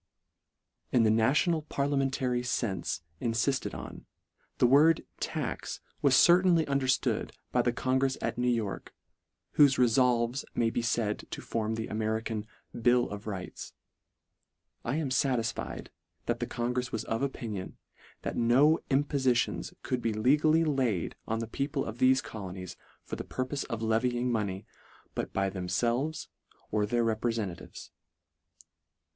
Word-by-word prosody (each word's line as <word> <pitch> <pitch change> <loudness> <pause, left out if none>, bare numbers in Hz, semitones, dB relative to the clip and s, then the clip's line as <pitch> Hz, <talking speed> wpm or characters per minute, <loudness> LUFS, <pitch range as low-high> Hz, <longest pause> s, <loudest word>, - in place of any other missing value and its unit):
In 120 - +4
the 110 - +4
national 140 +9 +3
parliamentary 135 -4 0
fenfe 95 -9 -2 0.2
in 115 - -1
lifted 130 +3 0
on, - - -9 0.5
the - - +4
word 150 +6 +5
" - - -33
tax - - -3
" - - -41
f - - -35
was 140 -3 +5
certainly 175 +1 +6
underftood 140 -2 +1 0.2
by - - +3
the 120 - +1
congrefs 130 +2 0
at - - -2
New 125 0 +1
York, 115 -5 -2 0.6
whofe 140 -3 +7
refolves 125 +1 +3
may 115 -1 +2
be 120 - -1
faid 115 -2 -1
to - - -5
form 110 -1 -2
the 110 0 -3
Ame 110 - -4
rican 110 0 -2 0.2
" - - -11
bill 120 0 +4
of 105 +1 -7
rights." 95 -4 -6 1.1
I 120 - -1
am 150 -4 -1
fatisfied 125 -5 -1 0.3
that - - -1
the - - -2
congrefs 125 +1 -2
was 115 -1 -2
of 115 +2 -2
opinion, 115 -8 -4 0.5
that - - -3
no 135 +7 +4
impo 140 +2 +3 0.2
litions 125 -2 +1
could 125 -1 -1
be 115 -1 0
legally 150 +9 +4
laid 130 - 0
on 110 - 0
the 115 0 -3
people 140 +4 -2
of 110 +2 -6
thefe 130 0 +4
colonies 95 -4 -7 0.3
for - - -6
the - - -4
purpofe 130 +2 -3
of 115 -1 -4
levying 120 +2 +1
money, 100 -4 -2 0.5
but - - -3
by 95 0 0
themfelves 120 - -1 0.4
or 105 -1 +1
their 120 +2 +1
reprefen 110 -4 -1
tatives. - - -12
120 Hz, 150 wpm, -30 LUFS, 110-135 Hz, 1.1 s, whofe